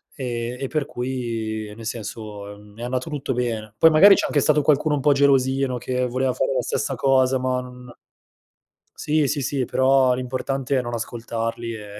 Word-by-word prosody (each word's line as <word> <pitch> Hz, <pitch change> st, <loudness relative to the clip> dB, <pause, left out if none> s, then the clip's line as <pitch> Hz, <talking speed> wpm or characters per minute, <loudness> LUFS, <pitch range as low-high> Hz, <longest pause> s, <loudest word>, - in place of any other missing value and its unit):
ehm, 120 Hz, -2 st, -4 dB
e 135 Hz, -, -3 dB
per 150 Hz, -1 st, -2 dB
cui 115 Hz, -4 st, -4 dB
nel 115 Hz, 0 st, -10 dB
senso, 105 Hz, -2 st, -6 dB
mhmm, 105 Hz, 0 st, -17 dB
è -, -, -6 dB
andato 130 Hz, +5 st, -3 dB
tutto 140 Hz, -2 st, -3 dB
bene. 110 Hz, -4 st, -3 dB
Poi, 165 Hz, +5 st, +6 dB
magari 195 Hz, +6 st, +8 dB
c'è -, -, 0 dB
anche 145 Hz, -, +1 dB
stato 150 Hz, +1 st, +3 dB
qualcuno 150 Hz, +1 st, +2 dB
un 140 Hz, -, -2 dB
po' 145 Hz, -, +4 dB
gelosino 135 Hz, -2 st, +2 dB
che 125 Hz, +1 st, -2 dB
voleva 130 Hz, +1 st, -1 dB
fare -, -, -1 dB
la -, -, 0 dB
stessa -, -, -2 dB
cosa 130 Hz, -1 st, +3 dB
ma 130 Hz, 0 st, -1 dB
non 125 Hz, -1 st, -12 dB, 1.1 s
sì, 150 Hz, -2 st, +1 dB
sì, 145 Hz, -2 st, -1 dB
sì, 135 Hz, 0 st, -1 dB
però 130 Hz, +1 st, +3 dB
l'importante 130 Hz, +2 st, -2 dB
è 130 Hz, -, +1 dB
non 120 Hz, 0 st, -6 dB
ascoltarli, 115 Hz, 0 st, -4 dB
ehm, 105 Hz, -1 st, -9 dB
125 Hz, 185 wpm, -22 LUFS, 115-135 Hz, 1.1 s, magari